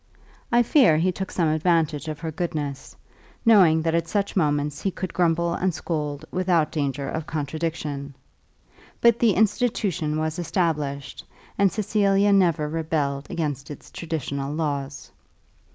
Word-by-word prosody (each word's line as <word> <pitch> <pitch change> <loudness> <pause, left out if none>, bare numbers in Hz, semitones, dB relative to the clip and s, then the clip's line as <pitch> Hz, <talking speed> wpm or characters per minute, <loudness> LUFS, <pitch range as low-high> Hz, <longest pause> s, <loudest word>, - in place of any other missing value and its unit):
I 240 0 +5
fear 235 - +5
he 180 +4 +2
took 190 +1 -5
some 170 -3 0
advantage 160 -1 +1
of 155 -1 -4
her 165 -1 -3
goodness, 150 -5 -4 0.5
knowing 180 -8 +6
that 165 0 0
at 170 0 0
such 200 -1 -1
moments 145 -4 0
he 195 - 0
could 185 -1 -5
grumble 170 -1 +1
and 185 +2 0
scold 150 -4 -3
without 180 -4 +1
danger 140 -2 -2
of 160 -1 -4
contradiction. 150 -2 -4 0.8
But 235 -1 +4
the 230 -4 +4
institution 195 -7 0
was 155 +2 -2
established, 150 -6 -2 0.3
and 200 -2 +3
Cecilia 205 -1 +2
never 170 -6 +3
rebelled 150 -3 -2
against 145 -4 -3
its 145 - -10
traditional 140 -4 -4
laws. 145 -3 -3
160 Hz, 135 wpm, -24 LUFS, 150-185 Hz, 0.8 s, knowing